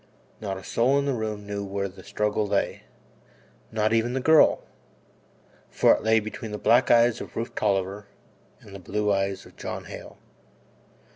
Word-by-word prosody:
Not 100 Hz, -3 st, -4 dB
a 95 Hz, -, -10 dB
soul 125 Hz, +7 st, +2 dB
in 140 Hz, -, 0 dB
the 140 Hz, -, 0 dB
room 110 Hz, -3 st, -4 dB
knew 100 Hz, 0 st, -4 dB
where 100 Hz, 0 st, -3 dB
the 95 Hz, -, -13 dB
struggle 105 Hz, 0 st, -1 dB
lay -, -, -1 dB, 0.9 s
not 110 Hz, 0 st, +1 dB
even 115 Hz, +2 st, +1 dB
the 135 Hz, -, 0 dB
girl 160 Hz, +4 st, +5 dB, 1.1 s
for -, -, +4 dB
it -, -, -2 dB
lay 110 Hz, 0 st, +3 dB
between 110 Hz, +1 st, -7 dB
the 105 Hz, -, -4 dB
black 120 Hz, +4 st, +3 dB
eyes 120 Hz, 0 st, +4 dB
of -, -, -9 dB
Rufe 115 Hz, +1 st, -4 dB
Tolliver 100 Hz, 0 st, -1 dB, 0.5 s
and 100 Hz, -, -14 dB
the 100 Hz, -, -8 dB
blue 105 Hz, +3 st, -1 dB
eyes 95 Hz, 0 st, -2 dB
of -, -, -17 dB
John -, -, -5 dB
Hale. -, -, -10 dB
105 Hz, 170 wpm, -25 LUFS, 100-115 Hz, 1.1 s, girl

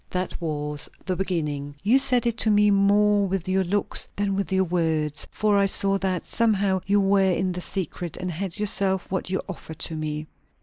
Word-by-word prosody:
"That 185 Hz, 0 st, -4 dB
was 150 Hz, -2 st, -3 dB, 0.2 s
the 185 Hz, -, -1 dB
beginning. 150 Hz, -6 st, -3 dB
You 235 Hz, +7 st, +4 dB
said 255 Hz, -3 st, +2 dB
it 235 Hz, -2 st, +1 dB
to 220 Hz, -, +3 dB
me 210 Hz, 0 st, +4 dB
more 200 Hz, 0 st, +3 dB
with 190 Hz, -2 st, -3 dB
your 190 Hz, +1 st, +1 dB
looks 200 Hz, +3 st, -1 dB
than 200 Hz, -1 st, -1 dB
with 195 Hz, 0 st, -3 dB
your 190 Hz, 0 st, +3 dB
words; 160 Hz, -4 st, 0 dB
for 210 Hz, -1 st, 0 dB
I 200 Hz, -, +3 dB
saw 195 Hz, 0 st, +4 dB
that, 185 Hz, -2 st, -2 dB
somehow, 200 Hz, -4 st, +1 dB
you 205 Hz, +1 st, +3 dB
were 195 Hz, 0 st, +3 dB
in 185 Hz, +1 st, 0 dB
the 180 Hz, 0 st, -5 dB
secret, 175 Hz, -3 st, -3 dB
and 180 Hz, 0 st, -4 dB
had 180 Hz, +2 st, -5 dB
yourself 195 Hz, -2 st, +1 dB
what 190 Hz, -1 st, -2 dB
you 190 Hz, -, -2 dB
offered 160 Hz, -4 st, -8 dB
to 160 Hz, +2 st, -2 dB
me. 155 Hz, 0 st, -4 dB
190 Hz, 200 wpm, -24 LUFS, 170-200 Hz, 0.2 s, You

